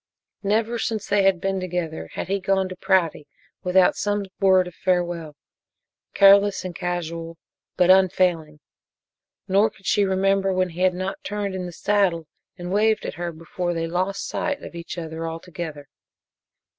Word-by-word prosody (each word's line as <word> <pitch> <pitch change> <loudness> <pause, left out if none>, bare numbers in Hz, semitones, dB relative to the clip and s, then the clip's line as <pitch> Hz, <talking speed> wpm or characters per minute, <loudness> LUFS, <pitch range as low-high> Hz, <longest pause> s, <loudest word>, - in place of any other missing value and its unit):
Never 220 +3 0
since 220 -2 -2
they 200 +1 +2
had 195 -2 +3
been 195 +1 -1
together 175 -3 -4
had - - -4
he 195 +1 0
gone 190 0 +1
to 185 - -7
Prouty 180 -5 +1 0.3
without 180 0 +4
some 205 -1 -1
word 190 -2 +4
of 180 - -9
farewell 175 -4 -1 0.8
careless 200 -1 +6
and 180 -2 -5
casual, 170 -2 -4 0.4
but 180 0 +5
unfailing. 175 -5 +2 0.9
Nor 200 +3 +4
could 195 -2 -22
she 205 - +3
remember 195 0 +2
when 185 0 +1
he 170 +2 -7
had 185 -1 +3
not 185 +1 -4
turned 205 -1 -3
in 185 -1 -4
the - - -7
saddle 180 -3 +1 0.3
and 175 0 -6
waved 215 +1 +2
at - - -4
her 170 +2 -4
before 175 +2 -4
they 165 0 -1
lost 185 +4 -2
sight 285 -2 -3
of - - -9
each 170 +1 -7
other 165 -1 -5
altogether. 165 -3 -7
185 Hz, 160 wpm, -23 LUFS, 170-195 Hz, 0.9 s, careless